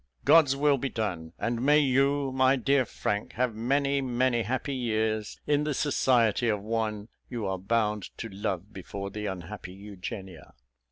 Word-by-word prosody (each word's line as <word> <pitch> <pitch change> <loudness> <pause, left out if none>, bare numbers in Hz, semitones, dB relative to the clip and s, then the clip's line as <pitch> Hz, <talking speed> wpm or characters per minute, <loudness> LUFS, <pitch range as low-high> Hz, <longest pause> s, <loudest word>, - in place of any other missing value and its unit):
God's 145 -5 +6
will 140 -1 +3
be 135 - -2
done; 90 -9 -3
and 120 0 -2
may 145 +3 +5
you, 140 0 +2
my 130 +1 +4
dear 135 +1 +2
Frank, 105 -2 -3
have 125 -1 0
many, 140 +5 +1
many 125 -1 +1
happy 130 +5 -2
years 110 -4 -1
in 145 0 +2
the 150 -2 -1
society 120 -5 +2
of 105 -2 +1
one 110 -1 -2 0.2
you 120 -4 -4
are 95 -1 -2
bound 105 0 0
to 115 - -5
love 100 -1 -4
before 100 +1 -6
the 105 +1 -4
unhappy 95 0 -6
Eugenia." 95 - -8
115 Hz, 160 wpm, -28 LUFS, 105-135 Hz, 0.2 s, God's